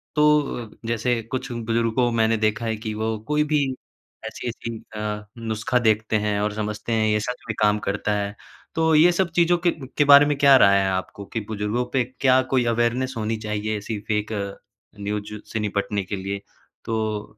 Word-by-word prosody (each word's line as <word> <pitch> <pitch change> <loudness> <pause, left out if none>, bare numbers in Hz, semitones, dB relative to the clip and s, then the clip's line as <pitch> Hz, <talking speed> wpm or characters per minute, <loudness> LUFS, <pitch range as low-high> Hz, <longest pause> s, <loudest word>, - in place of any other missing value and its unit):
तो 150 -7 +2 0.2
जैसे 115 +1 0
कुछ 130 -1 -3
बुजुर्ग 115 -1 -1
को 125 -2 +3
मैंने 110 0 +3
देखा 110 +1 0
है 110 -1 0
कि 110 0 -5
वो 110 +1 -2
कोई 150 0 +2
भी 145 - +4 0.6
ऐसी-ऐसी 115 -1 -5 0.2
अ, 105 0 -4
नुस्खा 115 +2 -1
देखते 110 -1 +1
हैं 105 -1 0
और 105 0 0
समझते 105 +2 -4
हैं, 110 -1 +2
ये 105 0 +2
सच 125 +4 -4
में 110 - -2
काम 105 0 +3
करता 100 +1 -1
है, 100 +1 -2 0.4
तो 160 0 +2
ये 170 +4 +7
सब 175 0 +1
चीज़ों 175 0 +4
के 175 - +5 0.3
के 145 - +5
बारे 140 +1 +9
में 145 -1 0
क्या 140 -1 +7
राय 100 -4 +6
है 95 - +1
आपको? 95 +2 -4
कि 115 - -4
बुजुर्गों 110 +3 -1
पे 130 -2 +3 0.2
क्या 130 -1 +5
कोई 125 -2 +3
अवेयरनेस 120 +3 0
होनी 110 0 -1
चाहिए 105 0 -2
ऐसी 105 +1 -5
फेक 105 0 -1 0.7
न्यूज़ 105 +1 -4 0.2
से 110 - -2
निपटने 100 -1 -1
के 95 - -4
लिए, 100 +1 -4 0.5
तो 110 -2 -1
110 Hz, 185 wpm, -23 LUFS, 105-125 Hz, 0.7 s, बारे